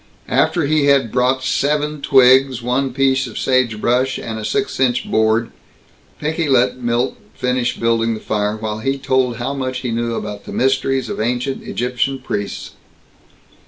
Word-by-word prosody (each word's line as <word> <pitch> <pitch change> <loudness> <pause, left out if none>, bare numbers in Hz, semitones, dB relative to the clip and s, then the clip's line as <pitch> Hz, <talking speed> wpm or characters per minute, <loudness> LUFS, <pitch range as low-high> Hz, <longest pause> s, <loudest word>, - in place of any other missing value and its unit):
After 170 -4 +2
he 150 0 +2
had 135 -5 +3
brought 130 +1 +1
seven 150 +2 0
twigs, 130 -2 +4
one 130 +2 0
piece 135 0 +1
of 115 - -9
sagebrush, 125 +1 +1
and 110 -1 -5
a - - -6
six 205 - -2
inch 125 -2 +1
board, 110 +1 +1 0.7
Pinky 160 +1 -1
let 130 -1 +2
Milt 120 +2 0 0.2
finish 125 -1 -1
building 115 0 +1
the - - -7
fire, 105 0 -1
while 110 0 -4
he 135 +5 -1
told 130 -2 +1
how 125 +3 -3
much 130 -2 -3
he 125 - -3
knew 115 0 -1
about 105 -2 -6
the - - -8
mysteries 135 -1 +1
of - - -4
ancient 125 +4 -1
Egyptian 125 +2 -2
priests. 105 -6 -5
125 Hz, 160 wpm, -18 LUFS, 115-135 Hz, 0.7 s, twigs